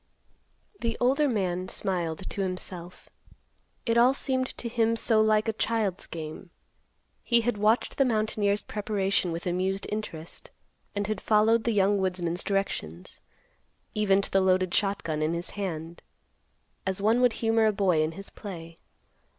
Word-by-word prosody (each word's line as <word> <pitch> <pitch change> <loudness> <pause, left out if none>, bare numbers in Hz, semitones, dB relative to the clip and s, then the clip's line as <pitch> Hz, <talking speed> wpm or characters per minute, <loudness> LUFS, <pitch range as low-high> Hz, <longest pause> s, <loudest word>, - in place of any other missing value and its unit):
The 230 -1 -2
older 275 +4 +3
man 185 -5 -1
smiled 175 -1 -2
to 200 - -3
himself. 180 -1 -5 0.8
It 230 0 +3
all 250 +3 +5
seemed 260 -2 0
to 240 - -3
him 230 -1 +1
so 225 -1 +3
like 215 0 +3
a 225 - +1
child's 215 -4 -1
game. 160 +3 -7 0.7
He 235 -1 +3
had 230 -2 -1
watched 215 +3 +2
the - - +7
mountaineer's 215 -3 +1
preparation 200 -3 -1
with 165 +1 -5
amused 185 +2 -1
interest, 175 -7 -6 0.5
and 205 0 -1
had 210 -1 -3
followed 220 +1 +3
the 235 - +2
young 200 -1 +3
woodsman's 180 -2 -1
directions, 145 - -3 0.7
even 200 -2 +3
to - - -4
the 195 - +4
loaded 185 -1 +2
shotgun 190 -6 0
in 155 +2 +1
his 170 +1 -4
hand, 170 -4 -5 0.8
as 190 0 -2
one 220 +4 +3
would 250 -2 +4
humor 225 -1 +2
a - - +4
boy 190 -6 +2
in 155 +1 0
his 195 +4 -9
play. 170 -5 -9
200 Hz, 150 wpm, -27 LUFS, 180-220 Hz, 0.8 s, the